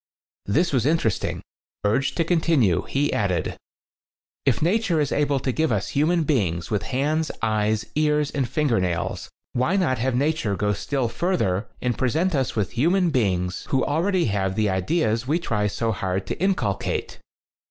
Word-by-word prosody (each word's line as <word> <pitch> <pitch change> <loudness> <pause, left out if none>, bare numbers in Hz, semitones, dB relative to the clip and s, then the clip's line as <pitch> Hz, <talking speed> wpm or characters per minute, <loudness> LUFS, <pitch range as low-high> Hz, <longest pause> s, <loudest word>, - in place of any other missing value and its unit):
This 165 - +1
was 130 -1 +2
interesting. 150 -10 0 0.4
Urged 120 +7 +1
to 165 - +3
continue, 160 - +2
he 145 +2 +1
added: 95 -4 0 0.9
"If 120 -5 +3
nature 180 0 +1
is 145 -2 0
able 145 -1 +1
to 130 0 -1
give 155 +2 0
us 105 -3 -1
human 160 +4 +2
beings 95 - 0
with 105 -1 +1
hands, 150 +4 0
eyes, 110 0 +1
ears 150 -1 +1
and 135 -4 -1
finger 130 -4 +1
nails, 90 -2 -2 0.2
why 130 +10 +1
not 160 -11 +1
have 130 +1 0
nature 140 -6 0
go 105 +1 0
still 130 +6 -1
further 115 - 0 0.2
and 125 -3 -1
present 160 +9 +1
us 135 -4 0
with 105 -4 -1
hu 130 +8 +2
man 180 -2 +2
beings 90 -8 0
who 135 - +2
already 175 +5 +1
have 95 -3 0
the 105 -2 +1
ideas 115 - 0
we 155 +4 +2
try 105 -11 -1
so 115 +2 -1
hard 95 -2 -2
to - - -4
inculcate?" 160 - -1
130 Hz, 165 wpm, -24 LUFS, 105-155 Hz, 0.9 s, to